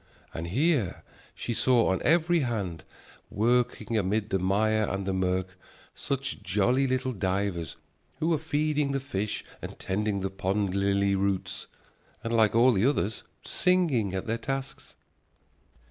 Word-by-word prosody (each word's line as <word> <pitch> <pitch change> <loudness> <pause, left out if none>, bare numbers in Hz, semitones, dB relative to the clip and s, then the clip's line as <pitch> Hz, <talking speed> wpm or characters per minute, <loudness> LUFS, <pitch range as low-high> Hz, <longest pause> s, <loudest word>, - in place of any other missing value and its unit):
And 80 +1 -4
here 125 - +1 0.3
she 120 - -3
saw 120 -3 +3
on 95 - 0
every 170 +1 +3
hand, 105 - -2 0.5
working 115 0 +1
amid 105 +2 -1
the 95 - +2
mire 105 +3 +2
and 95 0 -3
the 95 - -1
mirk, 95 0 0 0.4
such 135 -5 -3
jolly 105 +8 +2
little 130 0 0
divers, 95 -4 -2 0.4
who 160 +3 0
were 160 -3 +2
feeding 150 -2 0
the 135 - 0
fish 105 -6 -3 0.2
and - - -7
tending 100 +1 -1
the 95 0 -2
pond 95 0 -1
lily 100 0 +2
roots, 95 -1 -1 0.6
and, 115 - -2
like 110 -2 +3
all 120 +3 +6
the 100 -3 +1
others, 115 -6 0 0.2
singing 150 - +1
at 95 - -3
their 115 +1 -2
tasks. 135 0 -5
110 Hz, 145 wpm, -28 LUFS, 95-130 Hz, 0.6 s, all